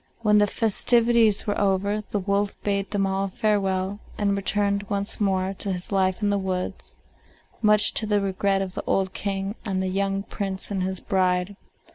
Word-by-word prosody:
When 210 Hz, -2 st, +4 dB
the 205 Hz, -, +4 dB
festivities 225 Hz, 0 st, +3 dB
were 205 Hz, -1 st, -1 dB
over, 200 Hz, +1 st, +1 dB
the -, -, -1 dB
wolf 200 Hz, +1 st, -1 dB
bade 200 Hz, -1 st, 0 dB
them 200 Hz, -1 st, 0 dB
all 195 Hz, 0 st, -1 dB
farewell, 195 Hz, -1 st, -1 dB, 0.2 s
and 200 Hz, -1 st, +1 dB
returned 200 Hz, 0 st, 0 dB
once 200 Hz, 0 st, -3 dB
more 190 Hz, -1 st, +1 dB
to 200 Hz, -, +1 dB
his 180 Hz, +1 st, -5 dB
life 190 Hz, +1 st, +1 dB
in 205 Hz, -, +2 dB
the 200 Hz, -, +1 dB
woods, 185 Hz, -1 st, -4 dB, 0.7 s
much 210 Hz, -1 st, +5 dB
to 215 Hz, -, +2 dB
the 210 Hz, -1 st, +2 dB
regret 195 Hz, 0 st, 0 dB
of 185 Hz, -1 st, -7 dB
the -, -, -5 dB
old 190 Hz, -1 st, 0 dB
King 195 Hz, 0 st, -3 dB
and 195 Hz, -4 st, -2 dB
the 190 Hz, 0 st, -1 dB
young 195 Hz, +1 st, -1 dB
Prince 195 Hz, -1 st, -5 dB
and 195 Hz, -2 st, -1 dB
his 190 Hz, 0 st, -2 dB
bride. 185 Hz, 0 st, 0 dB
200 Hz, 180 wpm, -24 LUFS, 190-205 Hz, 0.7 s, much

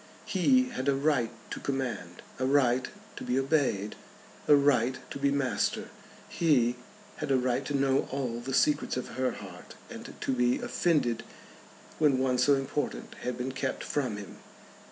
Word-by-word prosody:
He 255 Hz, +7 st, +3 dB
had 135 Hz, -, -4 dB
a 140 Hz, -, +3 dB
right 140 Hz, -4 st, +2 dB, 0.2 s
to -, -, -4 dB
command, 125 Hz, -10 st, -4 dB, 0.2 s
a 130 Hz, -, +1 dB
right 130 Hz, -2 st, +3 dB, 0.3 s
to -, -, -6 dB
be 125 Hz, -, 0 dB
obeyed, 135 Hz, -8 st, +1 dB, 0.5 s
a 145 Hz, -, +8 dB
right 130 Hz, -3 st, +3 dB
to -, -, -5 dB
be 140 Hz, 0 st, +3 dB
master. 140 Hz, -2 st, 0 dB, 0.4 s
He 125 Hz, -7 st, +2 dB, 0.4 s
had 150 Hz, -2 st, -4 dB
a 135 Hz, -, +4 dB
right 125 Hz, +1 st, 0 dB
to 145 Hz, -, 0 dB
know 135 Hz, 0 st, +2 dB
all 125 Hz, -4 st, -2 dB
the 125 Hz, +3 st, -5 dB
secrets 150 Hz, -2 st, +2 dB
of 125 Hz, -, -4 dB
her 130 Hz, 0 st, -1 dB
heart, -, -, -10 dB, 0.2 s
and -, -, -9 dB
to -, -, -1 dB
be 125 Hz, -1 st, +2 dB
offended 140 Hz, -9 st, +1 dB, 0.8 s
when 145 Hz, -4 st, +4 dB
one 130 Hz, -1 st, +1 dB
so 140 Hz, +3 st, +5 dB
important 135 Hz, +2 st, -3 dB
had 125 Hz, -1 st, -3 dB
been 125 Hz, +1 st, -3 dB
kept 130 Hz, 0 st, -3 dB
from 130 Hz, -8 st, -1 dB
him. 100 Hz, -1 st, -9 dB
130 Hz, 165 wpm, -29 LUFS, 125-140 Hz, 0.8 s, a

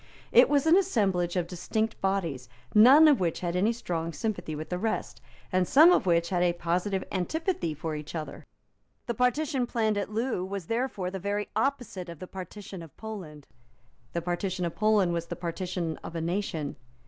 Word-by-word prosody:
It -, -, +7 dB
was 285 Hz, -1 st, +3 dB
an 320 Hz, +2 st, +6 dB
assemblage 195 Hz, -, +1 dB
of 180 Hz, -2 st, +1 dB
distinct 215 Hz, +6 st, -2 dB
bodies, 170 Hz, -11 st, -1 dB, 0.2 s
none 265 Hz, +9 st, +8 dB
of 295 Hz, -3 st, +5 dB
which 170 Hz, -3 st, -1 dB
had 175 Hz, -1 st, -2 dB
any 200 Hz, +5 st, +3 dB
strong 170 Hz, -8 st, -3 dB
sympathy 160 Hz, -2 st, -3 dB
with 155 Hz, +1 st, -6 dB
the 180 Hz, -, -2 dB
rest, 220 Hz, +2 st, -3 dB, 0.3 s
and 185 Hz, -1 st, +2 dB
some 315 Hz, +6 st, +7 dB
of 360 Hz, -, +3 dB
which 170 Hz, -1 st, +2 dB
had 180 Hz, -2 st, 0 dB
a 175 Hz, -1 st, +3 dB
positive 180 Hz, +3 st, -1 dB
antipathy 195 Hz, -, -1 dB
for 160 Hz, +1 st, -4 dB
each 150 Hz, +2 st, -7 dB
other. 155 Hz, -2 st, -6 dB, 0.6 s
The 235 Hz, -, -2 dB
partition 250 Hz, +2 st, +1 dB
planned 220 Hz, -3 st, 0 dB
at 200 Hz, -, -3 dB
Loo 225 Hz, -2 st, -1 dB
was 190 Hz, -1 st, -5 dB
therefore 225 Hz, -4 st, -2 dB
the 190 Hz, -, -4 dB
very 205 Hz, +2 st, -2 dB
opposite 245 Hz, -10 st, -1 dB
of 170 Hz, -, -8 dB
the 185 Hz, -, -7 dB
partition 190 Hz, 0 st, -8 dB
of 165 Hz, -3 st, -13 dB
Poland. 180 Hz, -10 st, -8 dB, 0.7 s
The 170 Hz, -, -2 dB
partition 180 Hz, +1 st, -2 dB
of 170 Hz, -, -3 dB
Poland 210 Hz, -4 st, +2 dB
was 170 Hz, 0 st, -2 dB
the -, -, -4 dB
partition 170 Hz, -1 st, -3 dB
of 170 Hz, -, -9 dB
a 165 Hz, -, -2 dB
nation. 165 Hz, -4 st, -2 dB
185 Hz, 185 wpm, -28 LUFS, 170-220 Hz, 0.7 s, none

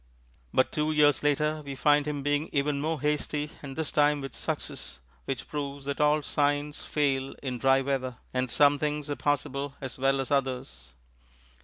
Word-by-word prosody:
But 130 Hz, -, +3 dB
two 155 Hz, 0 st, 0 dB
years 150 Hz, -1 st, +4 dB
later 150 Hz, +1 st, +1 dB
we 140 Hz, -1 st, -6 dB
find 145 Hz, +2 st, +3 dB
him 145 Hz, -2 st, -2 dB
being 145 Hz, +2 st, 0 dB
even 140 Hz, 0 st, 0 dB
more 160 Hz, +1 st, -1 dB
hasty 150 Hz, 0 st, -1 dB
and 135 Hz, -2 st, -7 dB
this 160 Hz, -1 st, -2 dB
time 150 Hz, 0 st, +3 dB
with 135 Hz, -1 st, -6 dB
success, -, -, -4 dB, 0.3 s
which 135 Hz, -, -4 dB
proves 140 Hz, -2 st, -4 dB
that 140 Hz, +1 st, -2 dB
all 150 Hz, 0 st, +4 dB
signs 145 Hz, 0 st, 0 dB
fail 135 Hz, -3 st, 0 dB
in 125 Hz, -3 st, -3 dB
dry 135 Hz, +1 st, +4 dB
weather, 130 Hz, -3 st, -2 dB, 0.2 s
and 130 Hz, 0 st, 0 dB
some 145 Hz, +2 st, +4 dB
things 150 Hz, 0 st, -2 dB
are -, -, 0 dB
possible 140 Hz, -1 st, -1 dB
as 130 Hz, -1 st, -6 dB
well 135 Hz, +1 st, +2 dB
as 135 Hz, -, -3 dB
others. 125 Hz, -, -2 dB
145 Hz, 175 wpm, -28 LUFS, 135-150 Hz, 0.3 s, years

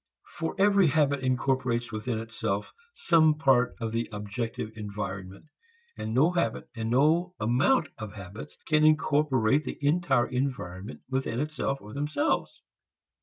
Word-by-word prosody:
For 160 Hz, -, -4 dB
every 200 Hz, -2 st, +5 dB
habit 140 Hz, -1 st, +2 dB
incorporates 130 Hz, -2 st, 0 dB
within 110 Hz, +2 st, -3 dB
itself 110 Hz, -2 st, -3 dB, 0.2 s
some 160 Hz, -, +4 dB
part 130 Hz, -5 st, +3 dB
of 115 Hz, -1 st, -3 dB
the 115 Hz, +1 st, -2 dB
objective 110 Hz, +2 st, -4 dB
environment, 100 Hz, -2 st, -6 dB, 0.5 s
and 110 Hz, -, -5 dB
no 140 Hz, +9 st, +4 dB
habit 175 Hz, -1 st, -1 dB
and 110 Hz, -1 st, -3 dB
no 160 Hz, +8 st, +2 dB
amount 130 Hz, -, +2 dB
of 110 Hz, -3 st, -6 dB
habits 100 Hz, +6 st, -9 dB
can 155 Hz, -1 st, +3 dB
incorporate 150 Hz, -4 st, +3 dB
the 130 Hz, -, -5 dB
entire 145 Hz, -4 st, +2 dB
environment 125 Hz, -7 st, -4 dB
within 130 Hz, -3 st, -2 dB
itself 150 Hz, -1 st, -2 dB
or 105 Hz, +1 st, -11 dB
themselves. 150 Hz, -, -1 dB
130 Hz, 130 wpm, -28 LUFS, 110-150 Hz, 0.5 s, every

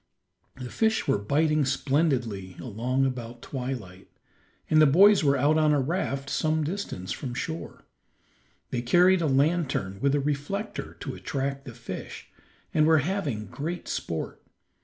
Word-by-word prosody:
The 125 Hz, -2 st, -8 dB
fish 220 Hz, -1 st, +1 dB
were -, -, +2 dB
biting 150 Hz, +7 st, +2 dB
splendidly 130 Hz, -, 0 dB
along 125 Hz, +3 st, -1 dB
about 120 Hz, -2 st, -5 dB
twilight, 125 Hz, -9 st, -6 dB, 0.6 s
and 155 Hz, 0 st, +5 dB
the 155 Hz, -, +7 dB
boys 195 Hz, +6 st, +6 dB
were 140 Hz, -1 st, +3 dB
out 150 Hz, +4 st, +3 dB
on 155 Hz, -1 st, +4 dB
a 145 Hz, -, +3 dB
raft 135 Hz, -2 st, -2 dB
some 155 Hz, +2 st, 0 dB
distance 150 Hz, -, -4 dB
from 125 Hz, -3 st, -4 dB
shore. 160 Hz, +6 st, -5 dB, 0.9 s
They 125 Hz, -, -1 dB
carried 175 Hz, +8 st, +4 dB
a 160 Hz, -, +1 dB
lantern 140 Hz, -, +1 dB
with 140 Hz, 0 st, +2 dB
a -, -, +2 dB
reflector 150 Hz, +10 st, -3 dB
to -, -, -4 dB
attract 140 Hz, -2 st, -3 dB
the 120 Hz, -4 st, -9 dB
fish, 120 Hz, -6 st, -8 dB, 0.4 s
and 155 Hz, -1 st, +4 dB
were 160 Hz, 0 st, +6 dB
having 150 Hz, -, -2 dB
great 160 Hz, -, -5 dB
sport. 80 Hz, -1 st, -4 dB
140 Hz, 145 wpm, -27 LUFS, 125-160 Hz, 0.9 s, the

